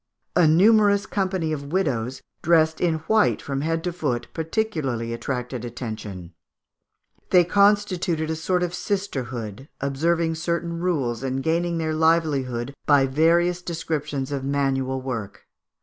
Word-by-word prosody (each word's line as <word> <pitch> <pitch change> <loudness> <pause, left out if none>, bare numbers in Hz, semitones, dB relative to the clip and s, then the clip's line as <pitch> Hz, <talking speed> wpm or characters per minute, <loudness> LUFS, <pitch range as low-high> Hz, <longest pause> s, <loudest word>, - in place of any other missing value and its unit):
A 175 -3 +5
numerous 200 +4 +5
company 190 -6 -1
of 140 -1 -6
widows, 130 -9 -1 0.2
dressed 160 -1 +3
in 170 -2 +2
white 220 -1 +3
from 135 -1 -3
head 165 +1 -1
to 180 - -2
foot, 145 -9 -2
particularly 155 - -2
attracted 125 0 -4
attention; 110 -7 -6 1.0
they 180 -1 +6
constituted 185 -4 +2
a - - -1
sort 180 +3 0
of 175 -1 -2
sisterhood, 130 - -4
observing 165 +4 0
certain 170 +1 -2
rules, 140 -10 -1
and 135 0 -2
gaining 170 +1 0
their 160 -1 -1
livelihood 145 -6 +1
by 145 -2 +5
various 170 +5 +2
descriptions 150 -5 -3
of 140 -2 -2
manual 135 -1 0
work. 110 -6 -5
160 Hz, 130 wpm, -24 LUFS, 130-175 Hz, 1.0 s, they